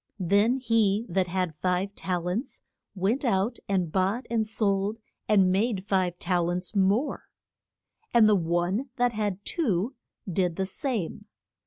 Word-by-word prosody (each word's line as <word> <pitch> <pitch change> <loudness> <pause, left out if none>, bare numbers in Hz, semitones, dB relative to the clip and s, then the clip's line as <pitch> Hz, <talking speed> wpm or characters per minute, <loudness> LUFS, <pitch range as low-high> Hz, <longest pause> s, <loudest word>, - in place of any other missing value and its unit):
Then 200 +7 +3
he 225 -4 +2
that 185 +1 +1
had 180 -2 -1
five 180 +5 -1
tal 180 -3 -3
ents 225 +10 -3 0.3
went 200 +9 0
out 205 -1 +1
and 185 -5 0
bought 195 +7 0
and 225 -2 +1
sold 210 -1 0 0.3
and 195 -3 +5
made 200 0 0
five 185 -4 0
tal 175 -1 0
ents 180 +3 -3
more. 200 +8 +1 0.9
And 230 -2 +6
the 215 - +5
one 175 +8 0
that 245 -2 +1
had 205 -2 -2
two 235 - 0 0.3
did 180 -2 0
the 190 - -1
same. 205 - -3
195 Hz, 145 wpm, -27 LUFS, 180-220 Hz, 0.9 s, And